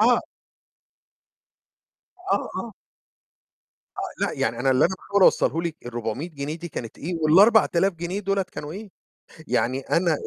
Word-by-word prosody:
آه. 240 +3 +5 2.1
آه، - - 0
آه. 235 - -5 1.2
آه، - - -3
لأ، - - -3
يعني 115 +1 -1
أنا 135 +1 +2
اللي 130 - +4
أنا 190 - +1
باحاول 200 +1 0
أوصله 165 -2 +4
لِك 170 -2 -3
ال400 120 +7 -4
جنيه 145 +1 -5
دي 170 +1 -7
كانت 115 -6 -7
إيه 175 +4 -4
وال4000 195 +2 +5
جنيه 175 +4 -4
دُولة 195 0 0
كانوا 155 -4 -8
إيه. 200 +2 -8 0.6
يعني 125 +4 +1
أنا 165 +2 +1
170 Hz, 140 wpm, -24 LUFS, 140-195 Hz, 2.1 s, آه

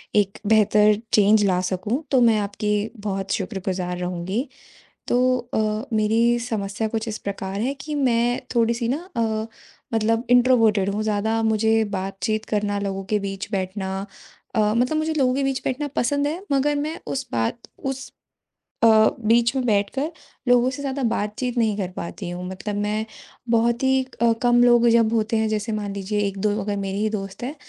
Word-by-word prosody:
एक 200 -1 +2
बेहतर 210 -1 +5 0.2
चेंज 210 0 +5
ला 185 -2 +2
सकूँ। 210 - -2
तो 260 -2 +4
मैं 225 -2 +5
आपकी 210 +1 -2 0.3
बहुत 195 -1 -2
शुक्रगुज़ार 185 -3 -3
रहूँगी। 180 - -3 0.6
तो 255 +1 +3 0.2
अ, 215 +2 0
मेरी 225 +3 +3
समस्या 220 -2 -2
कुछ 220 +1 -3
इस 220 -1 -3
प्रकार 195 0 -5
है 260 +4 0
कि 300 +2 -6
मैं 245 -3 +1
थोड़ी-सी 235 0 +2
ना 270 - +1 0.2
अ, 220 -1 0 0.5
मतलब 225 +2 +1
इंट्रोवर्टट 230 -5 +4
हूँ 210 +2 -2
ज़्यादा 220 +1 0
मुझे 220 0 +3
बातचीत 195 +3 -2
करना, 205 -1 -1
लोगों 195 -1 -3
के 210 +1 0
बीच 195 +1 -5
बैठना, 190 0 -3 0.5
अ, - - +2
मतलब 250 +7 +1
मुझे 315 +1 0
लोगों 255 -2 +2
के 275 - 0
बीच 270 -1 -1
बैठना 280 +3 -1
पसंद 285 +4 +1
है, 325 +5 -3
मगर 280 +2 +2
मैं 310 +3 -3
उस 275 0 -3
बात 115 - -1 0.2
उस 270 0 -4 0.7
अ, - - +7 0.3
बीच 235 +3 +3
में 260 - 0
बैठकर 220 +8 0 0.4
लोगों 245 0 +5
से 280 +2 -6
ज़्यादा 275 0 -3
बातचीत 230 +3 -2
नहीं 220 -3 +2
कर 195 -3 -2
पाती 175 +2 -6
हूँ। 175 +1 -5
मतलब 190 +3 -5
मैं 210 +1 -1 0.5
बहुत 235 +2 +2
ही 265 0 +3 0.2
अ, 230 -1 +5
कम 240 0 +4
लोग 240 -1 +5
जब 230 -1 +4
होते 225 0 +1
हैं 220 0 +1
जैसे 215 +1 -2
मान 205 -1 -3
लीजिए 200 +1 -2
1-2 200 +2 -1
अगर 205 +1 -2
मेरी 195 0 -3
ही 215 +1 +1
दोस्त 195 0 -5
हैं 265 +5 -4
220 Hz, 175 wpm, -23 LUFS, 200-245 Hz, 0.7 s, अ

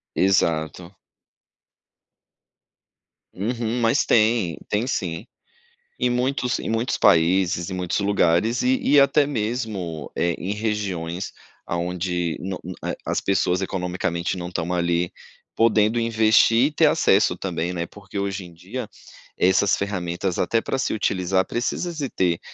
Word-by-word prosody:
Exato. 85 -1 +1 2.4
Uhum, 115 +3 -2
mas 115 +4 +3
tem, 110 -6 +3
tem 105 +4 0
sim. 90 -5 -3 0.7
Em 125 - +2
muitos 125 0 0
em - - -4
muitos 115 +3 0
países, 85 +1 +3
em - - -5
muitos 90 +2 -1
lugares 100 +3 +2
e 260 +1 +2
e 145 0 +5
até 140 +1 +4
mesmo, 105 - -3
eh, 85 0 +1
em 95 +3 -3
regiões 100 -5 -3 0.3
aonde 90 0 -2
no 95 0 -4 0.2
na - - -2
eh, - - -4
as - - 0
pessoas 90 -1 +1
economicamente 90 -1 -2
não 90 0 -5
estão 90 -1 -3
ali 85 0 0 0.4
podendo 110 0 +3
investir 115 +2 +4
e 150 - -4
ter 160 +1 +3
acesso 110 -9 +3
também, 90 -1 -3
né. 85 -1 -2
Porque 100 +2 -10
hoje 100 -1 -3
em 85 - -13
dia 85 - -6 0.5
essas 95 +2 +3
ferramentas, 90 -2 -3
até 115 -1 +1
pra - - -2
se - - -1
utilizar, 95 -3 0
precisa 145 +8 -2
se 145 -6 -4
ter, 85 -2 0
95 Hz, 135 wpm, -23 LUFS, 90-115 Hz, 2.4 s, e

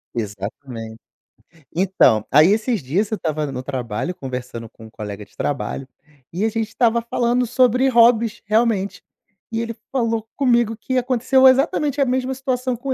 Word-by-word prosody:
Exatamente. 110 +2 -6 0.7
Então, 180 - +3
aí 150 +5 +6
esses 220 - 0
dias, 185 +11 0
eu 220 - -1
estava 155 -5 -2
no 130 0 -5
trabalho 130 +4 -3
conversando 125 -6 -7
com 110 -1 -15
um - - -12
colega 105 -2 -7
de - - -28
trabalho, 135 -1 -3 0.4
e 185 +5 -3
a 225 - +2
gente 225 0 -2
estava 235 0 +1
falando 240 +1 0
sobre 250 +2 +3
hobbies 230 -2 +4
realmente, 215 -2 +1 0.5
e 225 0 -1
ele 230 0 -4 0.2
falou 230 -4 -1
comigo 240 -5 +2
que 260 +4 -3
aconteceu 255 +1 +3
exatamente 280 +1 +2
a - - +4
mesma 260 +1 -1
situação 255 -1 -2
com 260 +3 -3
225 Hz, 160 wpm, -21 LUFS, -, 0.7 s, aí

